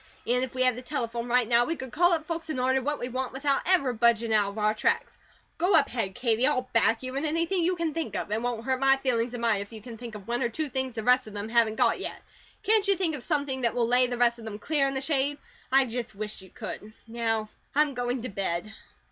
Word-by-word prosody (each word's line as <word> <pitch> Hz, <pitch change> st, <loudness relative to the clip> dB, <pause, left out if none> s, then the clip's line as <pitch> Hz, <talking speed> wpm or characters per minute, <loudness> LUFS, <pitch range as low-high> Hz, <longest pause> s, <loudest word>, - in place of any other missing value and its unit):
An' 250 Hz, +2 st, +2 dB
if 260 Hz, -1 st, -3 dB
we 255 Hz, -, +2 dB
had 255 Hz, -2 st, +3 dB
the 250 Hz, -, -7 dB
telephone 240 Hz, -3 st, -3 dB
right 245 Hz, -1 st, +2 dB
now, 235 Hz, 0 st, +4 dB
we 330 Hz, -, -1 dB
could 265 Hz, -5 st, -7 dB
call 350 Hz, +5 st, +4 dB
up 320 Hz, -2 st, -1 dB
folks 330 Hz, -1 st, -4 dB
an' 310 Hz, -, -2 dB
order 260 Hz, +1 st, +2 dB
what 295 Hz, +3 st, -1 dB
we 245 Hz, -, -4 dB
want 255 Hz, +1 st, -3 dB
without 275 Hz, +1 st, +1 dB
ever 280 Hz, -9 st, +3 dB
budgin' 230 Hz, -1 st, +2 dB
out 205 Hz, -2 st, +3 dB
of 200 Hz, -, -10 dB
our 215 Hz, 0 st, +2 dB
tracks. 215 Hz, -, 0 dB, 0.4 s
Go 355 Hz, +2 st, +3 dB
up 300 Hz, -3 st, +6 dB
ahead, 200 Hz, -6 st, -3 dB
Katie, 235 Hz, +1 st, +2 dB
I'll 255 Hz, -4 st, 0 dB
back 230 Hz, +1 st, +3 dB
you 255 Hz, 0 st, -5 dB
in 280 Hz, -, -1 dB
anything 330 Hz, +4 st, 0 dB
you 360 Hz, +2 st, +2 dB
can 335 Hz, -3 st, -2 dB
think 280 Hz, -11 st, -3 dB
of. -, -, -3 dB
It 215 Hz, +1 st, 0 dB
won't 240 Hz, -2 st, -2 dB
hurt 260 Hz, -1 st, 0 dB
my 270 Hz, 0 st, +5 dB
feelings 245 Hz, -2 st, 0 dB
a -, -, -3 dB
mite 230 Hz, -4 st, +1 dB
if 200 Hz, -, -8 dB
you 220 Hz, -, -8 dB
can 225 Hz, +1 st, -10 dB
think 235 Hz, -3 st, -8 dB
of 200 Hz, -2 st, -10 dB
one 240 Hz, +2 st, -1 dB
or 240 Hz, -, +1 dB
two 300 Hz, +5 st, -3 dB
things 260 Hz, -2 st, -1 dB
the 220 Hz, -, -3 dB
rest 250 Hz, +1 st, +3 dB
of 215 Hz, -, -10 dB
them 205 Hz, +2 st, -4 dB
haven't 230 Hz, -2 st, +3 dB
got -, -, +2 dB
yet. -, -, -6 dB, 0.4 s
Can't 430 Hz, -1 st, +3 dB
you 395 Hz, -, +4 dB
think 345 Hz, -4 st, 0 dB
of 290 Hz, -, -5 dB
something 280 Hz, -3 st, -1 dB
that 235 Hz, -2 st, 0 dB
will 235 Hz, -2 st, +2 dB
lay 250 Hz, +1 st, +4 dB
the 245 Hz, 0 st, -3 dB
rest 235 Hz, 0 st, +3 dB
of 225 Hz, -, -10 dB
them 210 Hz, -2 st, -6 dB
clear 280 Hz, +5 st, +1 dB
in 270 Hz, -, -3 dB
the 265 Hz, -, -1 dB
shade? 285 Hz, 0 st, 0 dB, 0.3 s
I 270 Hz, 0 st, +5 dB
just 235 Hz, -2 st, -5 dB
wish 210 Hz, 0 st, -6 dB
you 190 Hz, -, -14 dB
could. 215 Hz, +4 st, -8 dB
Now, 225 Hz, -2 st, -2 dB, 0.3 s
I'm 295 Hz, -1 st, +3 dB
going 245 Hz, -1 st, -2 dB
to 255 Hz, -, -4 dB
bed." 195 Hz, 0 st, -3 dB
250 Hz, 275 wpm, -27 LUFS, 225-275 Hz, 0.4 s, up